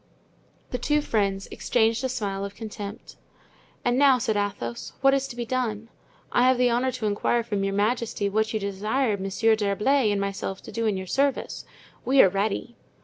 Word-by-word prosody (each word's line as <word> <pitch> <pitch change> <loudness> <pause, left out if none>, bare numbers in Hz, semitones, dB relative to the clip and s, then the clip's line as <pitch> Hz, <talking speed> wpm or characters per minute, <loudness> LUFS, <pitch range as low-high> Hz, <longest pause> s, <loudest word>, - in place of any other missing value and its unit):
The 250 - -2
two 295 +4 +2
friends 195 -6 -1
exchanged 230 +1 +1
a 260 - 0
smile 200 -6 -3
of 200 0 -6
contempt. 210 -1 -8 0.7
"And 245 +1 +2
now," 275 -2 +6
said 225 -2 -1
Athos, 195 -13 -3
"what 270 0 +5
is 275 0 +1
to 240 - -9
be 240 -1 -3
done? 230 -3 -2 0.4
I - - +3
have 260 -1 +4
the 250 -1 +3
honor 250 +2 +1
to 235 -3 -4
inquire 215 +3 +1
from 205 -4 -2
your 195 0 -1
majesty 215 0 0
what 220 +2 0
you 220 - -1
desire 210 +4 0
Monsieur 200 +3 +1
d'Herblay 215 +4 +2
and 205 - 0
myself 195 -1 -3
to - - -9
do 230 -1 -1
in 205 -3 0
your 190 - -5
service. 275 +7 -1 0.4
We 270 +1 +3
are 190 - +5
ready." 205 +5 -2
220 Hz, 190 wpm, -25 LUFS, 200-250 Hz, 0.7 s, now